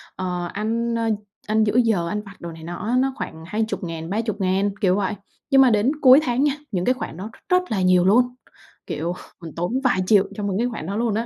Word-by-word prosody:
ờ, 180 -1 -3
ăn, 230 +3 -1
ơ, 230 -1 0 0.4
ăn 215 +1 +3
giữa 215 0 0
giờ, 220 -8 +2
ăn 210 - -2
vặt 200 -1 -13
đồ 170 -1 -6
này 160 0 -11
nọ 175 +4 -6
á, 245 - +1
nó 265 +1 +1
khoảng 160 - -7
20.000, 180 -6 -3
30.000, 200 -2 0
kiểu 185 -1 +3
vậy. 200 -1 -1 0.4
Nhưng 270 -1 +6
mà 260 - +6
đến 215 +3 +3
cuối 260 0 +8
tháng 250 +1 +1
nha, 290 -2 +3 0.2
những 180 -3 -1
cái 255 - +4
khoản 215 -9 -7
đó 205 +4 -6
r - - -19
rất 365 - +5
là 195 -3 0
nhiều 185 -1 +4
luôn, 245 +5 +3 0.5
kiểu, 170 +2 -2 0.3
mình 165 -2 -9
tốn 180 +11 -1
vài 250 -8 +2
triệu 200 0 +5
cho 210 - -5
những 195 -2 -1
cái 240 +3 +1
khoản 220 -9 -6
đó 195 +4 -4
luôn 230 -1 0
á. 230 - -1
210 Hz, 240 wpm, -22 LUFS, 185-235 Hz, 0.5 s, cuối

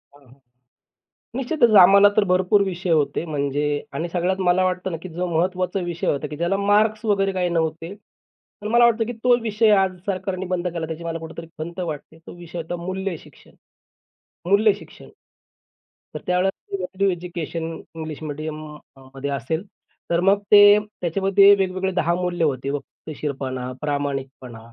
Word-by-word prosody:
हां, 145 -1 -21
हां, 130 +2 -21 1.0
निश्चितच 255 -2 +2
आम्हाला 200 +3 +7
तर 215 - +4
भरपूर 185 +3 +3
विषय 185 -1 -4
होते 155 0 +1
म्हणजे 145 -2 -2 0.3
आणि 170 +4 -3
सगळ्यात 180 +2 -1
मला 180 +1 +4
वाटतं 185 0 -2
ना, 165 - -3
की 185 - -8
जो 175 +2 -3
महत्त्वाचा 180 +2 0
विषय 175 -1 -4
होता, 145 +1 0
की 150 - -8
ज्याला 170 +4 0
मार्क्स 210 +2 +2
वगैरे 195 -2 +2
काही 180 -1 0
नव्हते. 165 +1 -2 0.7
पण 210 - -4
मला 240 +1 +6
वाटतं, 230 -1 +2
की 240 - -5
तो 245 -1 +5
विषय 220 0 +2
आज 185 -1 -2
सरकारने 190 -1 -3
बंद 180 -1 -2
केला, 170 -2 -3
त्याची 160 +1 -6
मला 165 0 -4
कुठेतरी 165 +1 -9
खंत 170 +3 -6
वाटते. 160 -2 -6
तो - - -9
विषय 175 0 -9
होता 165 +2 -4
मूल्यशिक्षण, 190 -2 -6 1.0
मूल्यशिक्षण. 205 0 +1 1.1
तर - - -3
त्यावेळेला 185 +2 -1
व्हॅल्यू 190 +1 -1
एज्युकेशन 170 -2 -5 0.3
इंग्लिश 155 -2 -6
मीडियम 155 +1 -5 0.4
म 135 0 -16
मध्ये 140 +1 -4
असेल, 140 +6 -2 0.5
तर 170 - +3
मग 195 +2 +3
ते 205 0 +9
त्याच्यामध्ये 195 0 +3
वेगवेगळे 190 -1 -1
10 170 -2 +1
मूल्य 180 -1 -1
होते. 135 -2 -2
वक्तशीरपणा, 135 -3 -5
प्रामाणिकपणा 135 -4 -4
180 Hz, 155 wpm, -22 LUFS, 160-195 Hz, 1.1 s, ते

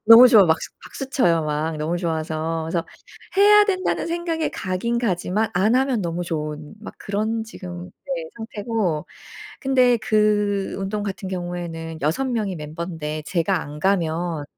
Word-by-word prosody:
너무 230 +3 +11
좋아. 220 -5 +8
막수 160 -1 +1
박수 270 - -7
쳐요 170 - +3
막 155 +1 -1
너무 155 +3 -1
좋아서. 160 -1 -2
그래서 165 +1 -2 0.5
'해야 415 +1 +7
된다.'는 375 -2 0
생각에 335 -1 -1
가긴 195 +6 -2
가지만 205 0 0
안 205 +7 +3
하면 260 -3 +2
너무 175 0 -2
좋은 150 0 -4
막 215 - -9
그런 220 +3 -2
지금 180 -5 -8 0.3
네, 165 - -4
상태고 215 -7 -2 0.5
근데 255 -3 +4
그 210 -2 +1
운동 200 +2 -2
같은 195 -1 -4
경우에는 175 -3 -5
6 160 - +1
명이 215 -7 -1
멤버인데 155 0 -5
제가 175 0 0
안 145 +1 -8
가면 170 -4 0
185 Hz, 290 characters per minute, -23 LUFS, 165-225 Hz, 0.5 s, 너무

